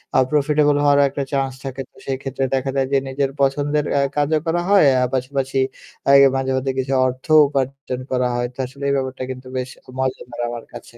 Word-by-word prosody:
আ - - +6
profitable 150 0 +3
হওয়ারও 145 0 +5
একটা 140 +1 -3
chance 135 -1 0
থাকে 135 0 -5
তো - - -42
সেই 135 -1 -1
ক্ষেত্রে 135 0 -3
দেখা 135 0 0
যায় 135 -1 +1
যে - - +5
নিজের 135 +1 -1
পছন্দের 145 +2 +1
এ্যা 140 - +3
কাজও 150 +1 +2
করা 170 +1 +1
হয়। 200 -5 +6 0.2
আ - - +3
পাশাপাশি 135 +1 -1 0.5
এই 140 - +8 0.2
মাঝে, 135 0 -1
মাঝে, 135 +1 -1
কিছু 130 +1 -1
অর্থ 130 0 -6 0.2
উপার্জন 135 -2 -3
করা 125 -1 +1
হয়। 120 0 0
তো - - -31
আসলে 135 +2 -11
এই 140 - +2
ব্যাপারটা 130 -1 -3
কিন্তু 130 0 -9
বেশ 130 0 -3 0.3
মজাদার 130 -2 -3
আমার 120 -1 -6
কাছে। 120 0 -11
135 Hz, 200 wpm, -20 LUFS, 130-140 Hz, 0.5 s, এই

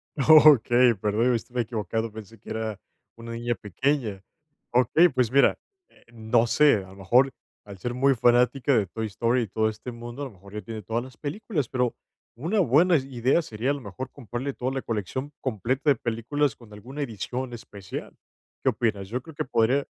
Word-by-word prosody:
Okey. 135 -5 +6
Perdón, 110 +5 +1
estaba 120 +2 -2
equivocado, 110 0 -3
pensé 110 0 -11
que - - -14
era, 110 -2 -3 0.4
una 115 0 -8
niña 120 0 -2
pequeña. 105 - -2 0.5
Okey, 130 +8 +5
pues 125 -3 0
mira, 140 0 +4 0.3
eh, - - -25
no 115 +1 +1
sé, 145 +3 +5
a 95 -1 -8
lo 95 - -14
mejor, 125 +8 +3 0.3
al 100 -2 -10
ser 120 +5 -3
muy 135 +1 +3
fanática 125 +2 +3
de 105 - +2
Toy 110 +4 -4
Story, 115 +4 0
y - - -5
todo 110 +3 0
este 110 +3 -7
mundo, 120 +3 -8
a - - -2
lo 130 - -8
mejor 100 +1 -16
ya 105 - -4
tiene 110 +1 -7
todas 115 +4 -2
las 130 -1 -13
películas, 150 - -3
pero 125 -2 0 0.4
una 170 - -1
buena 165 +3 +4
idea 130 +2 +1
sería, 120 -1 -2
a - - +1
lo 140 - -6
mejor, 120 +5 -7
comprarle 130 +1 -5
toda 130 +1 -3
la 135 -1 -3
colección 115 +6 -4
completa 130 - -1
de 140 - +5
películas 120 +3 -1
con 115 -3 -17
alguna 130 +8 -8
edición 125 +1 -4
especial. 100 -5 -8 0.5
¿Qué - - +4
opinas? 100 -4 -1
Yo 125 +2 -3
creo 160 +2 -13
que 155 0 -2
podría 125 +4 +2
120 Hz, 190 wpm, -26 LUFS, 110-135 Hz, 0.5 s, Okey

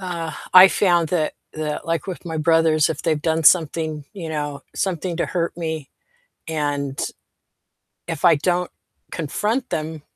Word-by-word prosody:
uh, 170 -3 -4 0.2
I 185 +1 +11
found 175 -6 +2
that 155 -3 0 0.2
that, 155 0 -4
like, 165 0 -1
with 185 -1 -6
my 160 -2 -4
brothers, 160 -1 +3
if 160 -2 -4
they've 155 -3 0
done 160 +1 0
something, 155 -3 +3
you 165 -5 -6
know, 145 -2 -4
something 180 -2 -2
to - - 0
hurt 170 -2 -2
me, 160 -4 -4 0.6
and 145 -3 -2 1.1
if 145 - -2
I 170 -2 +7
don't 175 +4 0 0.4
confront 210 - -2
them 155 0 -4
160 Hz, 150 wpm, -22 LUFS, 155-175 Hz, 1.1 s, I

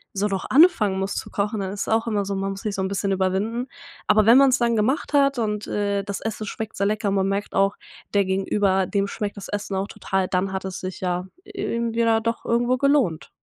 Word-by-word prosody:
so 200 +2 +1
noch 195 -2 -3
anfangen 255 - +5
muss 195 +1 -2
zu - - -5
kochen, 205 +1 -1
dann 190 -1 -3
ist 200 - -5
es - - -3
auch 225 +1 +2
immer 210 -3 0
so 195 0 -3
man 195 0 -2
muss 195 0 -7
sich 210 -2 -3
so 190 - -1
'n - - 0
bisschen 195 0 -1
überwinden. 195 +6 -1 0.4
Aber 215 0 +4
wenn 235 - +8
man's 275 -1 +5
dann 235 -1 +2
gemacht 230 +8 0
hat 275 -2 +3
und, 210 -2 -2
äh, 200 -1 -1
das 200 -1 -5
Essen 220 -1 -4
schmeckt 220 +2 -6
sehr 200 - +1
lecker 210 0 0
und 195 - 0
man 195 0 +1
merkt 200 +1 -3
auch, 195 +1 +2 0.4
der 200 - +4
Gegenüber, 190 0 +1
dem 200 +1 0
schmeckt 205 0 -4
das 200 - -7
Essen 205 -1 -4
auch 190 +1 -1
total, 190 -2 -2
dann 190 +1 -1
hat 190 0 -3
es 190 -1 -5
sich 185 0 -6
ja 180 -1 -1 0.2
irgendwie 235 - -2
ja 225 -1 +3
doch, 230 +1 -3
irgendwo 240 +2 +1
gelohnt. 275 - +1
205 Hz, 240 wpm, -23 LUFS, 195-230 Hz, 0.4 s, wenn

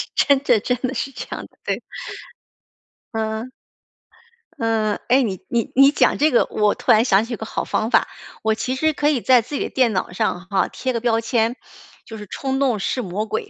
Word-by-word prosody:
真 280 -2 +4
的 240 -6 +4
真 250 +4 -1
的 260 0 -2
是 275 - -3
这 255 - -7
样 - - -7
的， - - -33
对。 - - -2 1.3
嗯。 220 +2 -3 1.1
嗯， 220 -2 +1
诶， 260 +3 +5
你 195 -7 -2
你 235 -2 -1
你 275 +2 +7
讲 295 - +2
这 305 +2 +4
个， 240 - +4
我 210 -1 +2
突 - - +2
然 220 +2 +5
想 205 -2 +3
起 240 - -8
一 - - -2
个 220 - -7
好 - - -3
方 220 +2 -1
法， - - +4 0.4
我 220 0 +2
其 255 +4 -2
实 315 +4 +1
可 295 0 0
以 285 -5 +1
在 250 0 +5
自 250 +6 -8
己 - - -1
的 - - -5
电 250 -4 +2
脑 185 -1 -2
上 190 -2 -2
哈， 195 -1 +1
贴 260 -1 -3
个 230 - -2
标 230 -1 +1
签， 230 +1 0 0.5
就 220 -1 -9
是 210 - -9
“冲 270 +5 -3
动 255 -6 +2
是 225 +6 -2
魔 205 0 -3
鬼”。 420 - -3
230 Hz, 230 characters per minute, -21 LUFS, 220-260 Hz, 1.3 s, 你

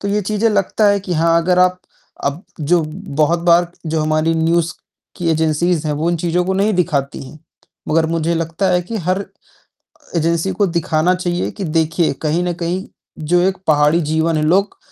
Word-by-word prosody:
तो 200 - -3
ये 210 +1 +1
चीज़ें 215 +3 +1
लगता 210 +1 +1
है 200 0 +2
कि 185 -2 -5
हाँ, 165 +1 +3
अगर 180 +1 +2
आप 180 0 +3 0.4
अब 140 +6 -2 0.2
जो 165 +3 +2 0.4
बहुत 170 +3 +2
बार 175 +1 +4
जो 160 0 -1
हमारी 155 +1 +1
न्यूज़ 165 +1 +1 0.4
की 170 -1 -2
एजेंसीज़ 160 +1 +1
हैं, 150 - 0
वो 160 +3 -1
इन 170 - 0
चीज़ों 175 +2 0
को 190 +1 -1
नहीं 205 +3 +2
दिखाती 145 -8 -1
हैं, 155 - -13 0.5
मगर 160 +1 +2
मुझे 165 +1 -1
लगता 165 +3 -1
है 180 0 +3
कि 225 +6 -5
हर 185 +2 -1 0.9
एजेंसी 170 +3 0
को 200 +2 +1
दिखाना 170 +1 +1
चाहिए 175 -1 -2
कि 200 - -7
देखिए, 165 0 +1
कहीं 160 +5 -1
न 180 - -1
कहीं 175 +2 -3 0.4
जो 175 +3 +2
एक 190 +1 +1
पहाड़ी 150 +2 +3
जीवन 160 +1 0
है 150 - 0
लोग 195 +6 +1
170 Hz, 190 wpm, -18 LUFS, 160-180 Hz, 0.9 s, बार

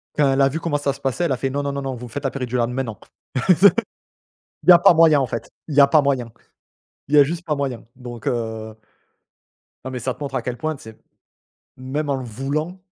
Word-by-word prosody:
Quand 140 -2 +3
elle 135 - +2
a 135 - +5
vu 160 - -4
comment 155 -2 -1
ça 140 -1 -1
se - - -15
passait, 135 +6 -1
elle 155 - -1
a 130 - 0
fait: 135 - -2
«Non, 145 +2 -2
non, 140 - -2
non, 135 -2 -4
vous 125 0 -8
me 115 - -12
faites 145 - -5
la 135 - -1
péridurale 125 -3 -2
maintenant. 125 -4 -4 0.5
Il 195 +6 +5 0.8
y - - +12
a 175 - +8
pas 175 0 +6
moyen 160 -3 +5
en 135 - +1
fait, 115 -1 -6 0.2
il 145 - -4
y 145 - +7
a 140 - +8
pas 150 +1 +4
moyen, 130 -5 -1 0.8
il 145 - +1
y - - +8
a 145 - +9
juste 170 +4 -4
pas 150 -3 0
moyen» 135 -4 -3
donc, 120 -2 -9
heu 110 -2 -3 1.1
non 130 - -4
mais 125 - -4
ça 130 +2 -2
te - - -22
montre 140 - -5
à - - 0
quel 125 -1 -4
point, 155 +5 -2
tu - - -15
sais? 110 0 -12 0.8
Même 140 +4 -4
en 140 - +1
le 130 -1 -5
voulant 145 - -4
135 Hz, 250 wpm, -21 LUFS, 125-150 Hz, 1.1 s, y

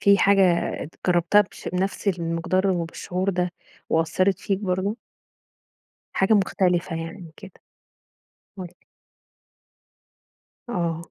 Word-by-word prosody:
في 200 0 +5
حاجة 200 0 +5 0.4
ات 155 - -9
جربتها 175 +3 +4
بش 205 - -5
بنفس 190 +3 -2
المقدار 175 +1 0
وبالشعور 180 +2 -2
ده 180 -1 -1 0.4
وأثَّرت 170 +4 +1
فيك 195 -2 -1
برضه؟ 195 +1 -1 1.2
حاجة 195 +3 +3
مختلفة 185 -4 +1
يعني 165 +1 -7
كده؟ 195 -1 -11 1.1
قل 185 - -5
لي. - - -20 1.9
آه. 170 -5 -2
185 Hz, 105 wpm, -24 LUFS, 170-195 Hz, 1.9 s, في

